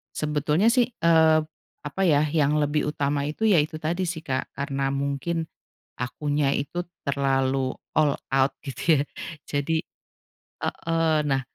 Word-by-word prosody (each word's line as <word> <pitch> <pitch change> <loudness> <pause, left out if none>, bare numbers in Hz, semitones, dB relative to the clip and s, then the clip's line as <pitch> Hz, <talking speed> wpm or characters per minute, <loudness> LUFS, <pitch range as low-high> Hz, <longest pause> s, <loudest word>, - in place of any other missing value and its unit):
sebetulnya 150 +5 +1
sih, 245 +1 +3
eee, 160 -4 +4 0.4
apa 145 +6 -5
ya, 150 -6 +4
yang 150 -1 +2
lebih 150 0 +1
utama 140 -1 -1
itu 155 +10 -1
ya 200 -5 +5
itu 155 +1 -6
tadi 170 +4 -1
sih 165 -2 -3
Kak, 135 -5 -3
karena 135 -1 -2
mungkin 140 +4 -2 0.5
akunya 145 +3 0
itu 145 +5 -2 0.2
terlalu 135 -2 +1 0.2
all 150 -2 +3 0.2
out 135 0 +3
gitu 150 +3 +2
ya, - - +2 0.4
jadi 145 +3 0 0.9
heeh, 165 -1 +1
nah 135 -1 +1
150 Hz, 135 wpm, -25 LUFS, 140-165 Hz, 0.9 s, ya